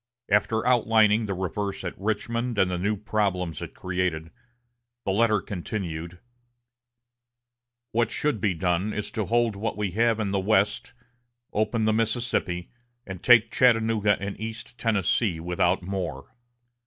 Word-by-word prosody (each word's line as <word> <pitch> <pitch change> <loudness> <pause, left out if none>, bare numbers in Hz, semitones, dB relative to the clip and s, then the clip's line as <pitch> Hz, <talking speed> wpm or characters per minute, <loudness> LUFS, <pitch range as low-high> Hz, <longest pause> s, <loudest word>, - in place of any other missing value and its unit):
After 110 +2 +2
outlining 110 -3 +4
the 100 - -2
reverse 95 +2 -3
at 90 - -4
Richmond 115 +3 -2
and 95 -2 +3
the 90 - -2
new 105 +3 0
problems 95 -6 -1
it - - -7
created, 90 -3 -2 0.7
the - - +1
letter 110 +1 +3
continued: 85 -3 -5 1.7
"What 115 0 +1
should 140 -3 -1
be 95 -3 +1
done 90 +4 0
is 105 - -4
to 110 - -2
hold 115 0 +1
what 105 +3 -3
we 105 -3 -1
have 115 +3 +2
in 105 -3 -1
the 100 - +1
West, 100 +1 +1 0.6
open 110 +1 0
the 110 - +3
Mississippi, 110 -6 -1 0.3
and 95 -2 -7
take 115 -2 +6
Chattanooga 115 -4 +3
and 100 +1 -5
East 115 +2 -7
Tennessee 100 -4 +1
without 90 +2 0
more. 90 -7 -5
105 Hz, 140 wpm, -26 LUFS, 90-115 Hz, 1.7 s, take